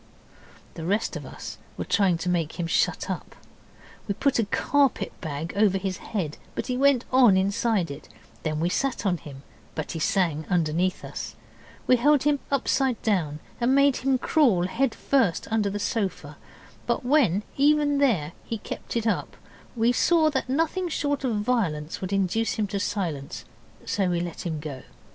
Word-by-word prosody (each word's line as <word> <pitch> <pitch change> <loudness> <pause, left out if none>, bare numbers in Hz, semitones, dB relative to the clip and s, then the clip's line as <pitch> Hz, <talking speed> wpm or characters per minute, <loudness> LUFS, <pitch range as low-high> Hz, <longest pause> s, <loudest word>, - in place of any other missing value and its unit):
The 165 - -7
rest 205 +6 0
of - - -6
us - - -8 0.2
were - - -3
trying 190 -5 +3
to 165 - -5
make 170 -1 -1
him 170 - 0
shut 165 - +1
up. - - -5 0.7
We 200 - -1
put 275 +1 +1
a 225 - +2
carpet 280 +6 +1
bag 155 0 -4
over 200 -2 +3
his 190 -1 -3
head, 170 -9 -4 0.2
but - - -2
he 250 - -2
went 270 -1 +3
on 245 -7 +6
inside 195 -2 +1
it; 140 +2 -9
and - - -22 0.2
then 155 -1 -2
we 165 - +1
sat 255 +5 -1
on 180 -3 +2
him, 140 -3 -11 0.3
but 155 - -4
he 165 - -4
sang 160 -2 +1
under 170 -5 +2 0.3
us; - - -6 0.5
we 255 - +5
held 290 +3 +4
him 290 -1 +2
upside 265 -2 +1
down 160 -8 0 0.2
and 245 +2 +3
made 280 -1 +4
him 265 0 +1
crawl 245 - +3
head 235 +6 0
first 230 -11 +1
under 215 -2 +2
the 200 - -3
sofa, 195 -9 -2 0.5
but 240 +1 0
when, 245 - +3
even 290 0 +3
there, 195 - +2
he 230 - -4
kept 215 - -5
it 230 - -1
up, 225 - -1 0.4
we 230 +1 +3
saw 315 +4 +3
that 265 -2 -2
nothing 330 +6 0
short 285 -3 -1
of 245 -4 0
violence 180 -10 -1
would 185 0 -4
induce 195 +3 +1
him 215 - 0
to 200 0 -3
silence, 175 -9 -3 0.4
so 195 -3 0
we 175 -1 0
let 175 0 -4
him 160 -2 -3
go. 145 -4 -6
205 Hz, 180 wpm, -26 LUFS, 170-260 Hz, 0.7 s, on